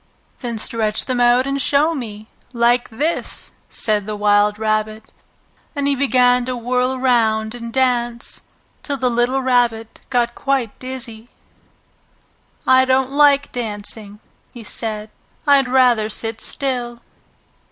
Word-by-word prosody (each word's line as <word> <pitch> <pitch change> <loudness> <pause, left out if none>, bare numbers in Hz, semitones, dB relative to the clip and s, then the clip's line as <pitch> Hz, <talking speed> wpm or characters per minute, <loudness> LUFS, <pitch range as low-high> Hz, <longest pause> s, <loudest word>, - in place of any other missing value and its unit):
"Then 235 -3 -4
stretch 220 -1 -1
them 255 -2 -1
out 245 +1 +4
and 275 0 -1
show 295 +5 +2
me, 215 -7 -6 0.3
like 240 +1 +2
this!" 295 +9 -3 0.2
said 210 -2 -1
the 215 - -3
wild 205 0 +3
rabbit. 215 0 -2 0.6
And 285 -1 -1
he 280 - +2
began 250 -2 +3
to 255 0 -3
whirl 250 +2 0
round 225 -4 +1
and 235 -1 -7
dance, 240 -2 -1 0.4
till 285 -1 -3
the 255 -2 0
little 245 +3 +1
Rabbit 240 -3 0
got 240 -2 +1
quite 265 -6 -2
dizzy. 245 -3 -7 1.4
"I 260 0 +6
don't 260 0 +1
like 285 0 +4
dancing," 210 -2 -5 0.3
he 240 - -10
said. 215 -1 -4 0.3
"I'd 280 -3 +4
rather 245 -4 +3
sit 225 0 -4
still!" 245 -4 -3
240 Hz, 130 wpm, -19 LUFS, 220-260 Hz, 1.4 s, I